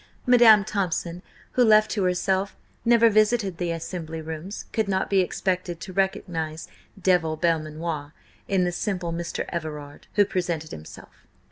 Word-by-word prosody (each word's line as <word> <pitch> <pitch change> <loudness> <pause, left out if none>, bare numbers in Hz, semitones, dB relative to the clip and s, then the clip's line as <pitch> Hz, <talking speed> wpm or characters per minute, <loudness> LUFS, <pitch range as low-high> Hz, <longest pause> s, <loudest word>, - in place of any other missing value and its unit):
Madam 235 -4 +7
Thompson, 180 -4 -2 0.3
who 250 - +3
left 215 -2 +5
to 210 - -1
herself, 190 +2 0 0.3
never 235 0 +5
visited 215 -4 +2
the 175 -1 -1
Assembly 165 -1 -5
Rooms, 160 +5 -6
could 220 -2 0
not 190 0 -1
be 195 - +4
expected 180 -1 -1
to 185 +2 -8
recognise 165 -4 -2 0.3
Devil 175 -4 +2
Belmanoir 155 -2 -2 0.4
in 190 -2 +2
the 175 - 0
simple 175 -2 -2
Mr. 170 0 -3
Everard 150 -4 -6
who 205 - +5
presented 170 -5 -3
himself. 80 0 -12
180 Hz, 140 wpm, -25 LUFS, 165-200 Hz, 0.4 s, Madam